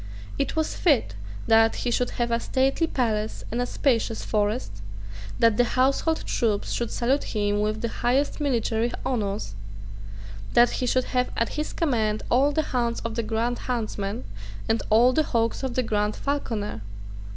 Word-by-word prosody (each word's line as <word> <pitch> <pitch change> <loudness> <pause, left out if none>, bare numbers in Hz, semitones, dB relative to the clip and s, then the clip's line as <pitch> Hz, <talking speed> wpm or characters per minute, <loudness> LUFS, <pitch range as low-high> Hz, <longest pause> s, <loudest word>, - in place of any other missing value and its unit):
It - - -1
was 315 -1 0
fit 280 - +2 0.3
that 225 0 +5
he 240 - +1
should 245 +1 +1
have 240 -1 0
a 230 - +2
stately 270 +7 +1
palace 220 -6 -1
and 235 +2 -1
a 245 - -1
spacious 230 -5 0
forest, 210 - -1 0.6
that 230 -2 +4
the 245 - +5
household 275 +5 +2
troops 215 -4 0
should 235 -2 -1
salute 255 +1 -1
him 205 -1 +1
with 215 +1 -1
the 235 - 0
highest 270 +5 +1
military 235 -4 0
honours, 205 - -2 1.0
that 240 0 +6
he 250 - -2
should 255 +1 +2
have 250 0 +2
at 230 - +1
his 300 0 -3
command 220 -9 0
all 270 +4 +4
the 315 +2 +1
hounds 235 -2 0
of 230 -1 -4
the 230 - -1
Grand 230 +2 -1
Huntsman 215 -3 -2 0.4
and 225 +1 +1
all 235 +4 +5
the 310 - +3
hawks 230 -6 0
of 265 -3 -3
the 255 - +2
Grand 210 -2 0
Falconer. 225 - -3
235 Hz, 165 wpm, -25 LUFS, 220-255 Hz, 1.0 s, that